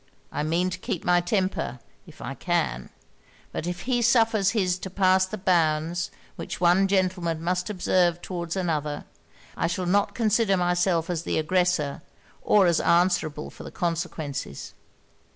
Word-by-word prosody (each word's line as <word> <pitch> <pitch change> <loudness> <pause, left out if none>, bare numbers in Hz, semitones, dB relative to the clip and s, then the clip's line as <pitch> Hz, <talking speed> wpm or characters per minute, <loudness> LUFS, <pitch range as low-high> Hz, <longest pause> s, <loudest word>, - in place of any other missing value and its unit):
I - - -2
mean 170 +4 0
to - - -5
keep 175 - -4
my 175 0 +4
temper, 175 - -1 0.3
if - - -12
I - - -4
can: 60 0 -1 0.6
but 170 - -4
if 180 0 -4
he 245 -1 0
suffers 225 -4 +3
his 185 -5 0
to 190 - -6
pass 185 0 +3
the 215 - -5
bounds 170 -2 +1 0.3
which - - -6
one 180 +2 +4
gentleman 180 -4 0
must 180 +2 -1
observe 180 -3 +1
towards 175 -1 -5
another, 155 -5 -2 0.5
I - - 0
shall 180 +2 -2
not 200 +3 +1
consider 220 -3 +2
myself 175 -1 +1
as 165 -3 -2
the - - -2
aggressor, 160 -3 +1 0.4
or 205 -2 +4
as 170 -2 +3
answerable 170 -4 +1
for - - -11
the - - -7
consequences.' 165 - -4
180 Hz, 150 wpm, -25 LUFS, 165-190 Hz, 0.6 s, my